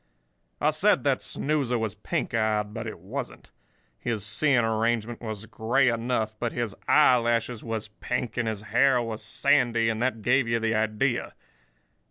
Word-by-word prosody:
"I -, -, +3 dB
said -, -, +3 dB
that -, -, +1 dB
snoozer 140 Hz, -5 st, -1 dB
was 110 Hz, -3 st, -2 dB
pink -, -, -3 dB
eyed, 105 Hz, -2 st, 0 dB
but 115 Hz, 0 st, -5 dB
he 110 Hz, -, -4 dB
wasn't. 120 Hz, +9 st, -7 dB, 0.5 s
His 110 Hz, -4 st, -2 dB
seeing 120 Hz, +2 st, +2 dB
arrangement 115 Hz, +1 st, -1 dB
was 110 Hz, -2 st, -6 dB
grey 120 Hz, +5 st, +1 dB
enough, 115 Hz, -2 st, -1 dB
but 120 Hz, -1 st, -2 dB
his 120 Hz, -4 st, -2 dB
eye 145 Hz, -4 st, +6 dB
lashes 120 Hz, 0 st, -1 dB
was 110 Hz, -2 st, -4 dB
pink 120 Hz, +3 st, -4 dB
and 120 Hz, -2 st, -1 dB
his 110 Hz, -2 st, -3 dB
hair 130 Hz, +4 st, +3 dB
was 115 Hz, -2 st, -4 dB
sandy, 120 Hz, -5 st, +2 dB
and 110 Hz, 0 st, -2 dB
that 120 Hz, -4 st, -1 dB
gave 125 Hz, +2 st, +3 dB
you 115 Hz, 0 st, +1 dB
the 115 Hz, 0 st, 0 dB
idea. 110 Hz, +3 st, 0 dB
115 Hz, 165 wpm, -26 LUFS, 110-125 Hz, 0.5 s, eye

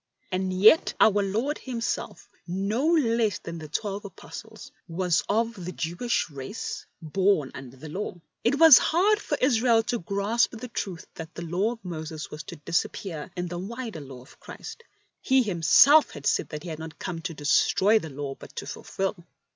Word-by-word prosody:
And 185 Hz, 0 st, -1 dB
yet 205 Hz, +12 st, +5 dB
Our 205 Hz, -1 st, +5 dB
Lord 225 Hz, +10 st, -1 dB
Himself, 235 Hz, -3 st, -4 dB, 0.2 s
no 200 Hz, -, -1 dB
less 230 Hz, -, +2 dB
than 170 Hz, 0 st, -7 dB
the 155 Hz, -, -8 dB
twelve 200 Hz, +6 st, -3 dB
Apostles, 220 Hz, +2 st, -10 dB, 0.2 s
was 175 Hz, -1 st, +1 dB
of 230 Hz, +2 st, +1 dB
the 180 Hz, -, -4 dB
Jewish 175 Hz, +9 st, -1 dB
race, 140 Hz, +10 st, -6 dB, 0.2 s
born 175 Hz, -3 st, +1 dB
under 130 Hz, -1 st, -10 dB
the 155 Hz, +4 st, -9 dB
Law. 185 Hz, +7 st, -4 dB, 0.3 s
It 280 Hz, -, +2 dB
was 320 Hz, -4 st, +10 dB
hard 405 Hz, +6 st, +3 dB
for -, -, -2 dB
Israel 235 Hz, -3 st, +3 dB
to 240 Hz, +1 st, -2 dB
grasp 200 Hz, +7 st, 0 dB
the 250 Hz, +3 st, -7 dB
truth 190 Hz, -6 st, -5 dB
that 165 Hz, +1 st, -9 dB
the 170 Hz, -, -6 dB
Law 190 Hz, +8 st, 0 dB
of 225 Hz, -5 st, -16 dB
Moses 160 Hz, -3 st, -6 dB
was 150 Hz, -, -6 dB
to -, -, -8 dB
disappear 170 Hz, +1 st, -3 dB
in 180 Hz, -1 st, -3 dB
the 175 Hz, 0 st, -5 dB
wider 225 Hz, -2 st, -6 dB
Law 130 Hz, -3 st, -10 dB
of -, -, -19 dB
Christ. -, -, -9 dB, 0.4 s
He 265 Hz, -1 st, +3 dB
Himself 215 Hz, -, +6 dB
had 145 Hz, -1 st, -10 dB
said -, -, +1 dB
that 150 Hz, 0 st, -6 dB
He 180 Hz, -, -6 dB
had 160 Hz, -1 st, -6 dB, 0.2 s
come 180 Hz, -3 st, -4 dB
not 165 Hz, -, -10 dB
to 170 Hz, -4 st, -3 dB
destroy 190 Hz, +8 st, +3 dB
the 160 Hz, -, -7 dB
Law 140 Hz, 0 st, -5 dB
but -, -, -14 dB
to -, -, -5 dB
fulfil. 190 Hz, -2 st, -4 dB
195 Hz, 180 wpm, -26 LUFS, 165-230 Hz, 0.4 s, was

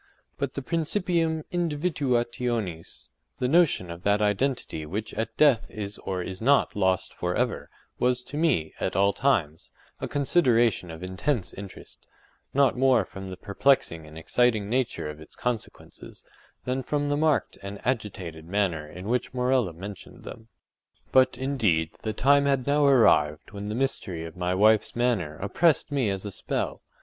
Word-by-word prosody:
But 140 Hz, -2 st, -2 dB
the 140 Hz, -, -4 dB
principium 165 Hz, 0 st, 0 dB
indivduationis, 125 Hz, -, -2 dB, 0.3 s
the 125 Hz, -, 0 dB
notion 150 Hz, -, +3 dB
of 85 Hz, +1 st, -8 dB
that 100 Hz, +2 st, +2 dB
identity 105 Hz, -, 0 dB
_which 105 Hz, +8 st, -5 dB
at 110 Hz, -, -3 dB
death 140 Hz, -7 st, +4 dB
is 105 Hz, -1 st, -5 dB
or 95 Hz, -2 st, -3 dB
is 95 Hz, +2 st, -7 dB
not 140 Hz, +4 st, +3 dB
lost 95 Hz, -2 st, +1 dB
forever_—was 125 Hz, +7 st, -2 dB
to 145 Hz, -, -9 dB
me, 145 Hz, -, +1 dB
at -, -, -2 dB
all 100 Hz, +1 st, +3 dB
times, 95 Hz, -, 0 dB, 0.3 s
a -, -, -3 dB
consideration 120 Hz, -, +2 dB
of 80 Hz, +2 st, -8 dB
intense 95 Hz, +5 st, -2 dB
interest; 100 Hz, -1 st, -11 dB, 0.4 s
not 140 Hz, -1 st, +3 dB
more 125 Hz, -5 st, +3 dB
from 95 Hz, +1 st, -9 dB
the 95 Hz, -1 st, -7 dB
perplexing 100 Hz, -, +1 dB
and 75 Hz, +1 st, -12 dB
exciting 110 Hz, +4 st, +1 dB
nature 125 Hz, -7 st, -1 dB
of 75 Hz, 0 st, -7 dB
its 80 Hz, -, -13 dB
consequences, 125 Hz, -3 st, -6 dB, 0.4 s
than 130 Hz, +1 st, -1 dB
from 145 Hz, +2 st, -1 dB
the 145 Hz, -, +1 dB
marked 150 Hz, -1 st, +1 dB
and 100 Hz, +1 st, -7 dB
agitated 95 Hz, -10 st, -3 dB
manner 90 Hz, -5 st, 0 dB
in 90 Hz, +4 st, -9 dB
which 125 Hz, +2 st, -1 dB
Morella 125 Hz, -5 st, +2 dB
mentioned 95 Hz, +4 st, -10 dB
them. 115 Hz, -, -10 dB, 0.6 s
But, 130 Hz, 0 st, +4 dB
indeed, 105 Hz, -, +1 dB
the 110 Hz, -, -2 dB
time 140 Hz, +3 st, +4 dB
had 135 Hz, -3 st, +1 dB
now 145 Hz, +1 st, +3 dB
arrived 75 Hz, -, +4 dB
when 100 Hz, 0 st, -6 dB
the 105 Hz, -, -3 dB
mystery 95 Hz, -10 st, -2 dB
of 80 Hz, -, -9 dB
my 90 Hz, 0 st, -1 dB
wife’s 110 Hz, +2 st, +3 dB
manner 115 Hz, -11 st, 0 dB
oppressed 145 Hz, -, +1 dB
me 135 Hz, -7 st, +1 dB
as 95 Hz, 0 st, -3 dB
a 105 Hz, -, -4 dB
spell. -, -, -3 dB
115 Hz, 155 wpm, -26 LUFS, 95-135 Hz, 0.6 s, death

